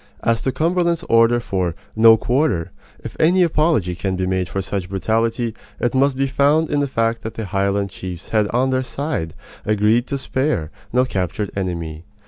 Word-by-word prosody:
As 115 -1 +1
to 130 - 0
Cumberland's 170 +2 0
order 115 +1 +5
for 95 -7 -2 0.2
"No 115 0 +7
quarter," 120 - 0 0.3
if - - -7
any 180 +3 +4
apology 155 - +1
can 95 +2 -2
be 95 0 -1
made 95 -1 -1
for 95 - -3
such 95 -1 -3
brutality, 115 +4 0 0.3
it 120 - 0
must 135 0 +2
be 135 - +2
found 145 +4 +2
in 145 - +1
the 145 - +1
fact 115 -2 0
that 110 - -6
the 110 - -4
Highland 100 +1 0
chiefs 90 -2 -8
had 110 -2 +2
on 125 +4 +1
their 130 0 +1
side 130 - -4 0.3
agreed 110 +3 +2
to 140 - -2
spare 130 - -1 0.2
no 125 +2 +3
captured 100 -2 -3
enemy. 85 -5 -4
115 Hz, 180 wpm, -20 LUFS, 95-135 Hz, 0.3 s, No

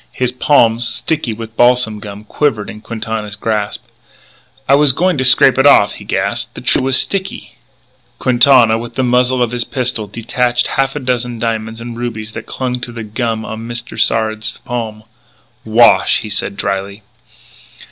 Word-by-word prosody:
His 125 -1 -1
palm, 120 -3 +3
sticky 120 +3 -1
with 110 0 -8
balsam 120 -3 +3
gum, 105 0 -9
quivered 110 -2 -1
in 105 - -12
Quintana's 110 -2 -5
grasp. 105 -1 -3 0.8
"I 135 - +4
was 145 -1 +4
going 180 +5 +1
to - - +1
scrape 130 +1 +5
it 135 - +5
off," 105 -7 +5
he - - -11
gasped. - - -2
"The - - -8
tree - - +1
was 130 0 +3
sticky 195 +4 -3 0.3
" 120 -1 -39
Quintana, 120 -3 +4
with 120 0 -8
the 130 - 0
muzzle 125 0 +2
of 120 - -2
his 120 -1 -2
pistol, 125 -4 -3
detached 120 +3 -1
half 135 0 -1
a - - -2
dozen 125 -2 -2
diamonds 110 0 -3
and 120 0 -7
rubies 115 -2 -5
that - - -8
clung 125 -1 -3
to 120 - -6
the 115 -1 -7
gum 110 +1 -3
on 110 +1 -7
Mr. 120 0 -6
Sard's 110 -1 0
palm. 115 -3 -5 0.6
"Wash!" 115 +2 +4
he 110 - -7
said 100 0 -3
drily. 100 +2 -3
120 Hz, 170 wpm, -15 LUFS, 110-125 Hz, 0.8 s, scrape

